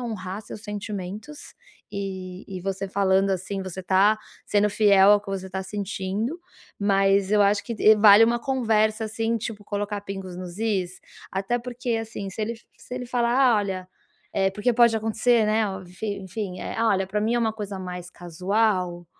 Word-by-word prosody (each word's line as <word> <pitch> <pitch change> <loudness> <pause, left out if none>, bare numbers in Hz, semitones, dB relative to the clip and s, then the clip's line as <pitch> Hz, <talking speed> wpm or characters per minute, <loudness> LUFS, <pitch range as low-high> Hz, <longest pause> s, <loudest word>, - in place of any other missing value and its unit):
honrar 210 -4 -5
seus 210 - -10
sentimentos 210 +6 -6 0.5
e 190 -2 -5
e 190 -2 -6
você 195 +1 -3
falando, 195 0 +2
assim, 190 +1 -2
você 185 0 -6
está 195 +4 +3 0.3
sendo 210 0 +2
fiel 200 -2 +5
ao 205 - +4
que 205 - -14
você 190 -1 -4
está 190 +1 -4
sentindo. 205 - -3 0.4
Mas 195 -1 +3
eu 210 -1 +5
acho 200 +1 +3
que 235 - -4 0.2
vale 210 +1 +8
uma 235 +1 +1
conversa, 225 -4 +1
assim, 225 +1 -1
tipo, 215 -2 -6
colocar 205 0 -3
pingos 195 -2 -7
nos 180 0 -8
"is". 195 -5 -1 0.3
Até 195 +5 -1
porque, 245 -1 -3
assim, 220 -3 -5
se 190 - -7
ele 230 +2 -2 0.2
se 250 - -9
ele 250 -1 -5
falar: 240 0 +3
"Olha". 190 -3 -2 0.5
É, 195 0 +3
porque 210 +5 0
pode 235 -1 +5
acontecer, 225 +1 +2
né, 215 +1 +2 0.2
enfim 195 +3 -5
enfim, 190 -1 -5
eh: - - -5
"Olha, 200 -4 +2
para 210 +2 -2
mim 220 +3 +1
é - - +2
uma 225 -2 +1
coisa 205 -3 -6
mais 180 -1 -6
casual". 180 0 -1
205 Hz, 170 wpm, -25 LUFS, 190-225 Hz, 0.5 s, vale